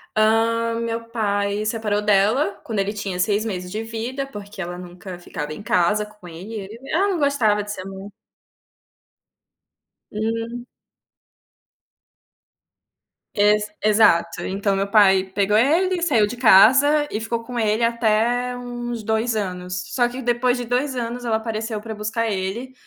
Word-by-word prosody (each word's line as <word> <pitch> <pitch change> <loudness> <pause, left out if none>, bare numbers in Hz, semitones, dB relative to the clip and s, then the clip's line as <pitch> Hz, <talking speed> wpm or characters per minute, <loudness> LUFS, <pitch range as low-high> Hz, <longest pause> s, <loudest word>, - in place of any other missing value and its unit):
Hã, 230 +1 +2
meu 230 0 -4
pai 205 -2 -1
separou 215 -2 -1
dela, 205 +1 +2
quando 220 -3 -3
ele 195 +1 -1
tinha 200 -4 -4
6 205 +3 +1
meses 180 -4 -4
de 215 +3 -3
vida 230 +5 -4
porque 205 -6 -9
ela 175 0 -5
nunca 180 0 -9
ficava 150 -3 -6
em 155 - -9
casa 205 +2 +1
com 210 -3 -15
ele 190 +5 -7 0.2
ela 390 +5 +2
não 370 -4 -1
gostava 240 -8 +2
de 205 - -6
ser 185 -2 -6
mãe. 195 +1 -8 2.0
Hum. 230 +3 -3 2.7
Ex 210 0 +3
exato, 210 -6 +3
então 195 +1 -1
meu 195 +1 -1
pai 195 -3 +5
pegou 200 +2 +1
ele, 345 +9 +2
saiu 265 -11 +3
de 210 - -5
casa 265 +7 +6
e 215 - -2
ficou 230 +1 -3
com 240 +1 -5
ele 220 +1 +1
até 235 +2 +1
uns 240 -2 -5
2 220 +2 0
anos. 180 -2 -3
Só 245 -2 +3
que 250 +2 -7
depois 245 +1 +1
de 245 - -4
2 255 +3 -1
anos 240 0 -4
ela 230 -2 0
apareceu 220 0 -4
para 220 +1 -7
buscar 220 +2 -2
ele, 210 +6 -3
220 Hz, 145 wpm, -22 LUFS, 200-240 Hz, 2.7 s, casa